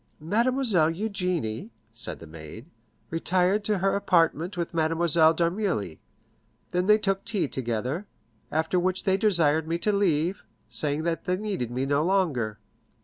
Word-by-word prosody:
"Mademoiselle 215 - +2
Eugénie," 180 - -2 0.2
said 115 - -3
the - - -12
maid, 80 - -10 0.5
"retired 180 +5 +1
to 210 -1 +1
her 195 +1 +1
apartment 175 -1 +1
with 170 -1 -3
Mademoiselle 165 0 +3
d'Armilly; 170 - -1 0.7
they 180 - +1
then 210 +3 +4
took 195 -2 -1
tea 205 -9 0
together, 130 - -3 0.4
after 160 +3 +1
which 185 +1 0
they 190 -1 +2
desired 165 -7 +3
me 165 +1 0
to 210 +4 +1
leave, 180 -2 +1 0.3
saying 150 +1 -1
that 170 0 -2
they 180 0 0
needed 195 - -3
me 125 +2 -2
no 140 +2 +1
longer." 155 - 0
170 Hz, 145 wpm, -26 LUFS, 150-195 Hz, 0.7 s, then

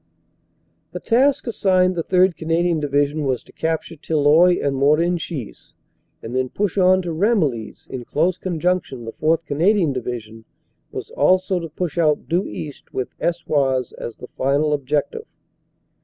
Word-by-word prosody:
The - - -4
task 265 +4 +2
assigned 185 -5 +2
the 170 - 0
3rd. 185 +1 +3
Canadian 165 +1 0
Division 145 +1 0
was 130 -3 -1
to - - -19
cap 160 0 -1
ture 165 - -12
Tilloy 160 +4 +4
and 140 -1 -1
Morenchies, 155 - -1 0.5
and 115 +3 -6
then 130 0 0
push 200 +3 -2
on 185 -1 +4
to 175 - -3
Ramillies. 160 - 0
In 125 -2 -6
close 170 +7 0
conjunction 175 -8 -2
the 115 - -6
4th. 160 +1 0
Canadian 165 +2 +2
Division 115 -3 -6 0.5
was - - -7
also 185 0 +2
to 165 -1 -6
push 170 +1 -3
out 155 -3 +2
due 175 +4 0
east 145 -3 -8
with 130 - -3
Eswars 140 -7 0
as 120 - -7
the 125 - -10
final 145 +3 +1
objective. 150 - -2
160 Hz, 150 wpm, -21 LUFS, 140-180 Hz, 0.5 s, Tilloy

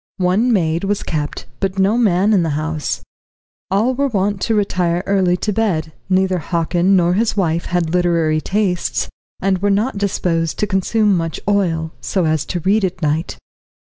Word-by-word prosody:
One 195 +7 +2
maid 170 -5 +1
was 200 +1 -1
kept, 150 -2 -3
but 195 0 -2
no 195 +3 +3
man 210 -3 +3
in 195 - +4
the 155 -3 -1
house. 155 -1 -3 0.7
All 215 +7 +2
were 280 +2 0
wont 200 -4 -1
to 225 - +1
retire 180 -4 0
early 185 -3 +2
to 210 +3 -2
bed; 170 -8 -1 0.2
neither 185 -1 +2
Hockin 170 +3 +1
nor 175 -1 +3
his 215 +2 0
wife 170 -3 0
had 175 -2 -1
literary 170 -3 +2
tastes, 195 -3 -1 0.3
and 190 -1 +1
were 205 +2 +1
not 205 +3 0
disposed 170 -5 -1
to - - +1
consume 205 +1 +1
much 165 -2 -2
oil, 170 -6 +1
so 185 -4 0
as 155 -1 0
to 175 - -3
read 200 +5 +2
at 180 -2 -2
night. 155 +3 -1
185 Hz, 175 wpm, -18 LUFS, 165-200 Hz, 0.7 s, in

